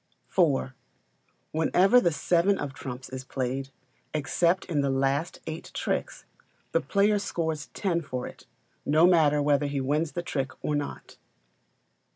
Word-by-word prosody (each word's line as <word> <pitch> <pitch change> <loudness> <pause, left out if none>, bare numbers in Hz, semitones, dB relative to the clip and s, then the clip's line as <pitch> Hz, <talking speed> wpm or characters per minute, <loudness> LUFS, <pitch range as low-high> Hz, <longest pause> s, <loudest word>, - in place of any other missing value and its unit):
iv. 140 -7 +2 0.8
Whenever 185 +9 +4
the 170 - +2
seven 175 +5 +2
of 140 - -4
trumps 130 -1 -7
is 130 0 -6
played, 135 +1 -3 0.5
except 170 +4 +1
in 155 -5 0
the 140 - +1
last 135 +4 0
eight 160 0 -6
tricks, - - -2 0.5
the - - +2
player 205 +1 +2
scores 160 -6 -3
ten 175 -4 0
for 130 -5 -4
it, - - -11 0.4
no 155 +3 +4
matter 155 -5 +4
whether 145 0 +2
he 140 -1 -2
wins 150 +4 0
the 175 - -3
trick 135 -6 -2
or 150 - 0
not. 145 -1 -5
150 Hz, 145 wpm, -27 LUFS, 135-175 Hz, 0.8 s, Whenever